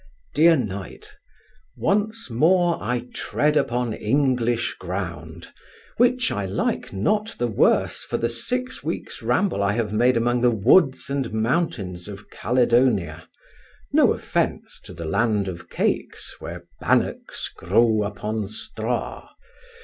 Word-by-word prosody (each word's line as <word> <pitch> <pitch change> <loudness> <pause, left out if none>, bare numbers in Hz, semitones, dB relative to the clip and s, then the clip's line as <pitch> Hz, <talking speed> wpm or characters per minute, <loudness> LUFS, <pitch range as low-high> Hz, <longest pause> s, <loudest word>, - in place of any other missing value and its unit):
DEAR 165 +2 +6
KNIGHT, 100 -6 -6 0.6
Once 210 - 0
more 170 +7 +3
I 125 0 -2
tread 150 +1 0
upon 125 -5 0
English 120 0 +1
ground, 85 -3 -6 0.5
which 245 0 +3
I 105 - -2
like 95 - -2
not 210 - 0
the 120 - 0
worse 110 - +2
for - - -3
the 115 - 0
six 250 - -3
weeks' - - -5
ramble 190 - +1
I 100 0 +2
have 110 -2 -1
made 120 +3 +3
among 120 +1 +1
the 125 - +5
woods 130 - +3
and 135 -4 -1
mountains 110 - -1
of 100 0 -10
Caledonia; 120 -9 +1 0.6
no - - +5
offence - - -2
to - - -9
the 85 0 -6
land 105 +4 +1
of 90 -2 -7
cakes, - - -2
where - - -8 0.2
bannocks - - 0
grow 110 +5 +2
upon 105 +1 -3
straw. 110 +2 -4
115 Hz, 125 wpm, -23 LUFS, 100-140 Hz, 0.6 s, DEAR